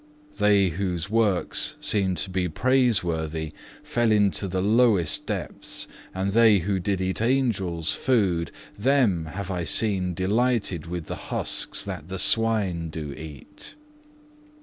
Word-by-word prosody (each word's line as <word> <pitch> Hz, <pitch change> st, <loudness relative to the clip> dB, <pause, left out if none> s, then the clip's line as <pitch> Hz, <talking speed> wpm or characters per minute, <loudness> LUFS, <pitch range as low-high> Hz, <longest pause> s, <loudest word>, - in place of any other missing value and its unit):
They 100 Hz, -2 st, +4 dB
whose 90 Hz, +1 st, -3 dB
works 100 Hz, -, +1 dB
seemed 95 Hz, -3 st, +1 dB
to 95 Hz, -, -11 dB
be 90 Hz, -1 st, -1 dB
praiseworthy, 85 Hz, -, 0 dB, 0.3 s
fell 120 Hz, -2 st, +1 dB
into 105 Hz, -2 st, +2 dB
the 95 Hz, 0 st, -2 dB
lowest 105 Hz, -4 st, +3 dB
depths, -, -, -4 dB, 0.2 s
and 95 Hz, +1 st, -2 dB
they 110 Hz, -1 st, +5 dB
who 95 Hz, +2 st, -1 dB
did 95 Hz, +1 st, -1 dB
eat 95 Hz, +2 st, -1 dB
Angels' 100 Hz, -, 0 dB
food, 95 Hz, -10 st, +1 dB, 0.3 s
them 110 Hz, -, +2 dB
have 95 Hz, +4 st, -6 dB
I 90 Hz, -2 st, -2 dB
seen 90 Hz, +1 st, 0 dB
delighted 100 Hz, -3 st, 0 dB
with 85 Hz, -1 st, -5 dB
the -, -, -5 dB
husks -, -, -1 dB
that 90 Hz, -6 st, -6 dB
the 95 Hz, 0 st, -5 dB
swine 100 Hz, -6 st, +2 dB
do 75 Hz, -3 st, -6 dB
eat. 75 Hz, -2 st, -9 dB
95 Hz, 130 wpm, -25 LUFS, 85-110 Hz, 0.3 s, they